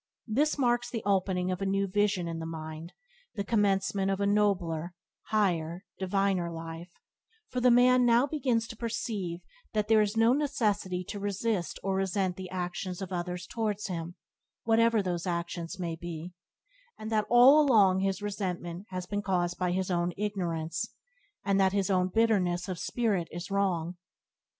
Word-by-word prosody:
This 285 +8 +1
marks 240 -2 +1
the 230 -3 -4
opening 185 -2 +1
of 185 +1 -3
a - - 0
new 195 +1 +1
vision 195 -2 +1
in 165 -1 -4
the 160 - -5
mind, 160 +1 -7 0.4
the 200 - -2
commencement 195 -2 +1
of 195 0 0
a 200 - +1
nobler, 180 -5 +1 0.3
higher, 180 -4 0
diviner 190 -2 +1
life; 165 +1 -7 0.6
for 250 - -2
the 250 - +5
man 250 +1 +5
now 240 +2 +5
begins 255 -6 0
to 230 - -7
perceive 210 -6 -3 0.3
that 210 -1 0
there 220 -1 +6
is 210 +1 -1
no 225 +2 +5
necessity 210 -10 0
to 205 +3 -6
resist 200 -3 -2
or 195 - 0
resent 190 -1 0
the 185 0 -7
actions 180 0 -4
of 190 -1 -5
others 180 0 -3
towards 210 -1 -2
him, 170 -1 -5 0.5
whatever 225 -1 +3
those 175 -1 -2
actions 170 +1 -3
may 170 -3 -3
be, 170 +1 -7 0.6
and 220 +1 -7
that 215 -1 +1
all 255 +5 +8
along 205 -10 +5
his 195 +1 -1
resentment 185 -2 -4
has 185 -1 -4
been 205 +2 -2
caused 175 -3 -1
by 180 -1 +1
his 185 +1 -1
own 175 0 0
ignorance, 170 -6 -3 0.5
and 200 -1 +2
that 190 -1 +3
his 200 -1 +1
own 185 -1 +3
bitterness 185 -4 +1
of 185 -3 -4
spirit 210 -8 0
is 175 +3 -7
wrong. 180 -3 0
195 Hz, 165 wpm, -29 LUFS, 175-215 Hz, 0.6 s, all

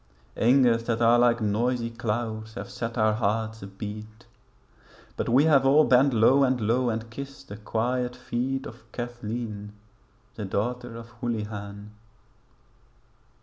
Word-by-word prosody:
Angers 120 -1 +4
that 115 -1 0
are 120 +1 +5
like 120 -1 +3
noisy 115 +3 0
clouds 110 -1 -3
have - - -7
set 115 +1 -4
our 110 -1 +3
hearts 110 0 -1
abeat; 105 +3 -8 0.9
But - - -2
we 130 +5 +5
have 145 -4 +5
all 140 +3 +6
bent 135 +1 +5
low 125 +4 +5
and 130 -1 +2
low 120 +3 +1
and 115 0 -3
kissed 140 +2 -9
the 100 - -7
quiet 125 +3 -1
feet 125 +2 -3
Of 115 0 -12
Cathleen 115 -3 -5 0.6
the 105 - -5
daughter 120 +5 -3
of 115 0 -10
Houlihan. 105 -3 -4
115 Hz, 135 wpm, -26 LUFS, 110-125 Hz, 0.9 s, all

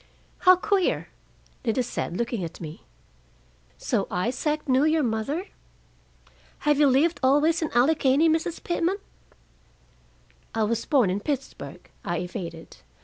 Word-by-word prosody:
"How 370 0 +7
queer!" 385 0 0 0.5
Lida 250 +1 +1
said, 185 -6 -4
looking 235 -4 -2
at 165 0 -7
me. 155 -2 -9 0.9
"So - - -1
Isaac 260 - -1
knew 260 +1 +3
your 310 0 +3
mother? 260 - -2 1.2
Have 295 -1 +3
you 295 - +6
lived 285 +6 +3
always 295 +6 +3
in 315 - -1
Allegheny, 275 +3 +4
Mrs. 325 +1 0
Pitman?" 345 +2 0 1.6
"I 225 - +2
was 230 +2 0
born 255 -11 +3
in 195 - -1
Pittsburgh," 270 +4 -5 0.2
I 175 - -2
evaded. 170 -2 -6
270 Hz, 125 wpm, -25 LUFS, 220-315 Hz, 1.6 s, How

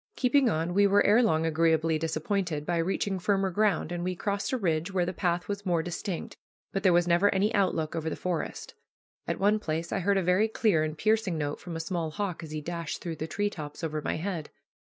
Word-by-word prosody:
Keeping 260 0 +3
on, 165 -1 -1
we 200 +2 +5
were 200 +1 +4
ere 215 +4 +6
long 160 -8 +2
agreeably 160 0 +2
disappointed 160 0 -1
by 175 +1 0
reaching 190 +3 -1
firmer 195 +1 +1
ground, 195 -4 +1
and 175 0 -3
we 185 0 -1
crossed 200 +6 -2
a 260 - +1
ridge 170 -3 0
where 185 -2 +1
the 185 - -3
path 175 0 -1
was 200 0 -4
more 175 -4 +1
distinct, 175 +1 -4 0.4
but 195 - -1
there 190 -2 +4
was 175 0 +3
never 175 +4 +4
any 205 +4 +2
outlook 170 -6 +1
over 160 -1 -2
the - - -3
forest. 180 -3 -4 0.5
At - - -1
one 210 +2 +3
place 165 -2 -3
I - - 0
heard 200 +2 +2
a 190 - +1
very 180 +5 +3
clear 215 -7 +2
and 155 0 -3
piercing 215 -3 +1
note 145 -1 -2
from 175 -2 -7
a - - -3
small 165 -1 -2
hawk 190 +1 -3
as 160 - -8
he 155 0 -4
dashed 170 0 -4
through 165 -3 -5
the 155 - -4
tree 205 +4 -1
tops 150 -2 -8
over 155 -1 -2
my - - -2
head. 170 -2 -4
175 Hz, 230 wpm, -28 LUFS, 160-200 Hz, 0.5 s, ere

